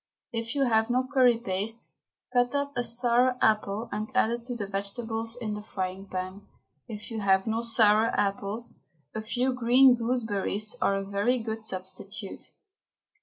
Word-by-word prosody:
If 230 +2 -3
you 280 - +2
have 225 -2 +2
no 255 +1 +1
curry 250 -3 +5
paste, 215 +2 -3 0.4
cut 245 +2 +2
up 285 0 -1
a 245 - 0
sour 245 +2 +2
apple 215 +1 +1
and 215 +1 -3
add 240 -3 +3
it 235 0 -4
to 245 -1 -4
the 210 -4 -3
vegetables 225 +3 -3
in 215 -3 -3
the 210 - -5
frying 190 -2 -5
pan. 185 +2 -5 0.4
If 215 +1 -8
you 225 - -3
have 190 -1 +3
no 225 0 0
sour 225 -2 +4
apples, 205 +2 -1 0.3
a 220 - -3
few 250 +4 0
green 250 +2 +6
gooseberries 220 -3 0
are 200 - +3
a 195 - -2
very 200 +6 +1
good 225 -1 -5
substitute. 195 +1 -6
225 Hz, 165 wpm, -28 LUFS, 200-240 Hz, 0.4 s, green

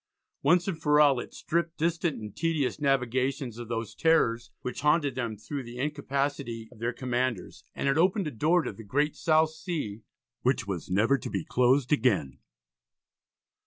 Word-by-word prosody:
Once 175 +6 +3
and 165 -5 -3
for 150 -1 +4
all 140 -4 +5
it - - -7
stripped 170 0 -2
distant 165 -2 0
and 105 -2 -8
tedious 160 -5 0
navigations 130 -2 0
of 120 - -6
those 115 -2 -3
terrors 120 -7 +2
which 125 +2 -5
haunted 150 -1 +3
them 120 -4 -3
through 140 +7 -5
the 120 -1 -9
incapacity 140 -4 -2
of 120 - -16
their 120 +1 -1
commanders, 125 -4 -2
and - - -2
it 140 +3 +2
opened 190 +3 +3
a 150 - -3
door 160 +8 +2
to - - -4
the 115 - -11
great 145 +8 0
South 160 -1 +3
Sea 155 - -4 0.4
which 130 -3 +1
was 95 -4 -5
never 115 +9 +3
to - - -6
be 95 -5 -3
closed 130 +3 +3
again. 100 - +1
135 Hz, 170 wpm, -28 LUFS, 115-155 Hz, 0.4 s, all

